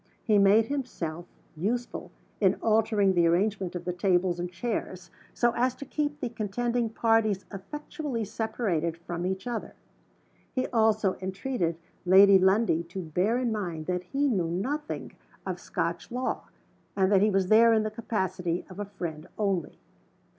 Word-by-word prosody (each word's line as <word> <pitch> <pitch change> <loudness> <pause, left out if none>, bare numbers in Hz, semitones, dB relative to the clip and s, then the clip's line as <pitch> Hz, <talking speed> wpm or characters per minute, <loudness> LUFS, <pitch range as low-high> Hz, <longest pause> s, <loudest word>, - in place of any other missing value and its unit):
He 210 -2 +4
made 200 +3 +5
himself 175 - -4 0.3
useful 235 +9 -3 0.3
in 195 -2 +4
altering 215 -3 +2
the 170 -2 +4
arrangement 190 +1 +1
of 175 - -5
the 180 - -1
tables 180 -1 +1
and 175 0 -3
chairs, 185 -3 -4 0.2
so 240 -1 +2
as 250 +1 +1
to 280 - -8
keep 290 +1 -2
the - - -2
contending 235 +2 -1
parties 220 -3 +2
effectually 250 - -5
separated 195 -7 -2
from 170 +1 -4
each 190 +3 -3
other. 240 -3 -4 0.8
He 255 - +1
also 220 -4 +2
entreated 190 -2 -2 0.3
Lady 195 +2 +7
Lundie 190 -2 +3
to 175 +3 -7
bear 180 +9 +1
in 250 -2 0
mind 175 -7 -3
that 180 +1 -1
he 280 +10 0
knew 185 -10 +1
nothing 270 - -3 0.3
of - - -3
Scotch - - -3
law, 250 +1 -2 0.5
and 190 0 +3
that 195 -2 +5
he 210 - +4
was 190 -2 +1
there 230 +2 +7
in 220 -1 +3
the 215 - -2
capacity 190 -6 -2
of 185 - -10
a 205 - -2
friend 175 -5 -6
only. 195 -6 -1
200 Hz, 155 wpm, -28 LUFS, 180-230 Hz, 0.8 s, Lady